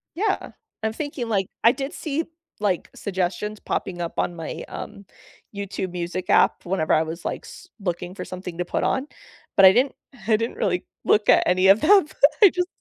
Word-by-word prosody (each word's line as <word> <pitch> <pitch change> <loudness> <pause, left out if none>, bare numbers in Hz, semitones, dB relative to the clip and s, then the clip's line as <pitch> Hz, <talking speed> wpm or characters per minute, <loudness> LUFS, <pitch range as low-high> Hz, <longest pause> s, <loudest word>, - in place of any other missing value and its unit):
yeah, 400 +3 -1 0.3
I'm 220 0 -1
thinking 280 -3 -4
like, 195 -3 +1 0.2
I 230 - +7
did 275 +4 -5
see, 315 -1 -2 0.4
like, 200 -4 -1
suggestions 195 +2 -3
popping 175 -2 -3
up 170 - -5
on 175 - -1
my, 165 -2 -6
um, 200 -2 -8 0.5
YouTube 190 -2 -4
Music 180 +1 -4
app - - +3
whenever 175 -3 0
I 155 - +4
was, 160 +2 -7
like, - - -4
s - - -12
looking 180 -1 -4
for - - -6
something 180 -2 -7
to 180 - -2
put - - -2
on, 265 +1 0 0.5
but 195 - +7
I 190 - +7
didn't 260 +5 +2 0.3
I 220 -2 +4
didn't 230 +2 -3
really 180 -1 0 0.2
look 210 0 +3
at - - +6
any 185 +1 +3
of 195 +3 +6
them, 390 0 +6 0.3
I 405 - +10
just 360 0 -1
195 Hz, 190 wpm, -23 LUFS, 180-245 Hz, 0.5 s, I